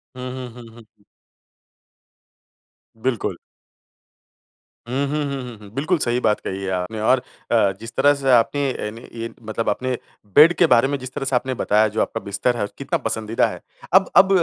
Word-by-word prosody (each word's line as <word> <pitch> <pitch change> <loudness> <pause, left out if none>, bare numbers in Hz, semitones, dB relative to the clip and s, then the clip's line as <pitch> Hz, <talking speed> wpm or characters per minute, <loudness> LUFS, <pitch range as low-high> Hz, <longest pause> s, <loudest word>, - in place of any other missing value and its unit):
हुँ, 125 0 -6
हुँ, 130 -1 -6
हुँ, 120 -1 -12
हुँ। 120 -1 -14 2.1
बिल्कुल। 120 0 -2 1.5
हुँ, 135 +3 0
हुँ, 150 +1 -1
हुँ, 140 -1 -3
हुँ, 120 -3 -8
हुँ। 105 -1 -13
बिल्कुल 155 +6 +1
सही 120 -2 +1
बात 110 -3 +2
कही 95 +1 -5
है 95 - -2
आपने 90 +4 -3
और 125 +4 +3 0.3
अ, 110 -4 +4
जिस 115 +1 -8
तरह 145 +2 +5
से 135 -1 -2
आपने 135 +3 +3
अ, 105 - -4
अन 115 +1 -8
मतलब 115 +1 -1
आपने 130 -1 -1 0.4
बेड 155 +4 +8
के 175 - +6
बारे 125 -2 +5
में 140 - -1
जिस 130 0 -8
तरह 135 - -3
से 135 - 0
आपने 130 +1 0
बताया 110 -2 +2
जो 110 - +2
आपका 115 - -1
बिस्तर 100 +5 0
है - - -2
और 105 - -1
कितना - - -1
पसंदीदा 110 +1 0
है। - - -7 0.3
अब 190 +1 +5
अब 190 - +8
125 Hz, 185 wpm, -22 LUFS, 110-135 Hz, 2.1 s, बेड